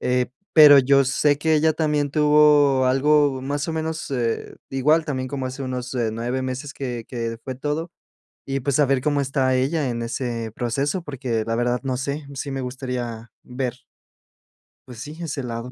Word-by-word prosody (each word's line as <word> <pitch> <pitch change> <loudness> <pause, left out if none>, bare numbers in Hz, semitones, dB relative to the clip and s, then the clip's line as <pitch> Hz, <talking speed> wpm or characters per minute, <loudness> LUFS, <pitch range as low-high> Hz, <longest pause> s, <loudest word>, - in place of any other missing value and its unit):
eh, 125 0 +1 0.3
pero 150 -3 +9
yo 135 +1 +4
sé 145 +2 +2
que 160 +1 +2
ella 155 +1 +3
también 150 -2 0
tuvo 150 -3 +4
algo 140 0 +3
más 145 +3 -2
o - - -1
menos, 160 -1 -4
eh, 120 -3 -2 0.2
igual, 150 +5 +2
también 130 -3 -3
como 135 -1 -4
hace 130 +2 -6
unos, 125 -1 -4
eh, 115 -3 0
9 120 +3 -2
meses 130 +2 -4
que 120 -4 -5
que 115 -2 -4
fue 130 - -5
todo. 150 +5 -3 0.6
Y, 135 0 -2
pues, 140 +1 0
saber 140 -3 +3
cómo 145 +1 +1
está 135 -1 +1
ella 140 +2 0
en 120 -1 -3
ese 115 -1 -3
proceso, 140 - -1
porque, 125 -6 -3
la 115 0 -1
verdad, 120 +1 0
no 130 -1 -1
sé, 140 +3 -4
sí 140 +1 -5
me 135 -1 -3
gustaría 125 -3 -5
ver. 125 0 -5 1.0
Pues 120 -3 -10
sí, 150 +4 -8
ese 150 -4 -3
lado. 120 0 -5
135 Hz, 180 wpm, -23 LUFS, 125-145 Hz, 1.0 s, pero